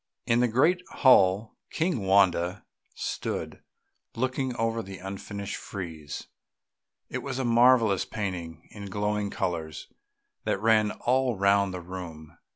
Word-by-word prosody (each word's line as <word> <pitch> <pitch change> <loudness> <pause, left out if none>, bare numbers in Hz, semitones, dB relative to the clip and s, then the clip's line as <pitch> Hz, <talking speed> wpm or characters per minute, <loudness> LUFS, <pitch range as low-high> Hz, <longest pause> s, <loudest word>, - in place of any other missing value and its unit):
In 115 - +3
the 125 - +4
great 155 +11 +3
hall 105 -4 +4
King 160 - -1
Wanda 95 -1 +3 0.3
stood, - - -4 0.5
looking 130 +1 -1
on 115 0 -1
the 95 0 -8
unfinished 100 +2 -6
frieze; 80 -7 -7 0.9
it - - -2
was - - -5
a 130 - -1
marvellous 115 -4 +4
painting 90 -6 -5
in 100 -1 -8
glowing 105 +1 -1
colours 80 -5 -4 0.5
that - - 0
ran 110 0 +4
all 125 +1 0
round 100 0 +3
the 90 -1 -5
room. 85 -4 -9
100 Hz, 125 wpm, -27 LUFS, 95-115 Hz, 0.9 s, the